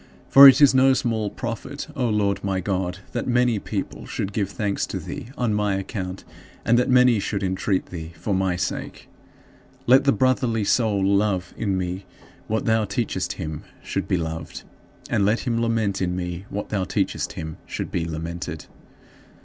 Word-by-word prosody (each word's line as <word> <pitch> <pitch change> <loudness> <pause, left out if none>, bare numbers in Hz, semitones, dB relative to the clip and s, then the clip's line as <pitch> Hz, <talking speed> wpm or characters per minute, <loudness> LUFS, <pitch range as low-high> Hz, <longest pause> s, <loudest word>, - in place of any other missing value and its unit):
For 140 +1 +11
it 135 +1 +7
is 145 -2 +7
no 130 0 +5
small 110 -5 -1
profit, 120 +6 -5
O 125 -3 0
Lord 105 -2 0
my 95 -1 0
God, 95 -1 -2
that 120 - -3
many 125 -3 +2
people - - -5
should 100 - -4
give 100 -3 -1
thanks 105 -2 -2
to - - -4
thee - - -7
on 120 -4 0
my 105 -1 +1
account 95 -1 -5 0.4
and 120 - +4
that 125 - +1
many 125 -3 +5
should 100 0 -2
entreat 95 +1 0
thee 80 -2 -6
for 90 +6 -3
my 95 -1 +1
sake. 90 +1 -4 0.8
Let 130 +3 +5
the 140 - +5
brotherly 130 -4 +1
soul 100 -2 +2
love 100 -2 +1
in 100 -4 -1
me 90 +1 -4 0.4
what 110 +1 -1
thou 110 -1 +3
teachest 105 +3 -2
him 75 -1 -5 0.2
should - - -3
be - - +1
loved, 80 -1 -5 0.4
and 100 - +1
let 105 +4 +2
him 115 -3 -1
lament 110 -4 0
in 90 -1 0
me 90 +1 -4
what 105 - -5
thou 100 -3 -1
teachest - - -2
him 80 0 -6
should - - -5
be 85 - -1
lamented. 85 +1 -5
100 Hz, 175 wpm, -23 LUFS, 95-115 Hz, 0.8 s, For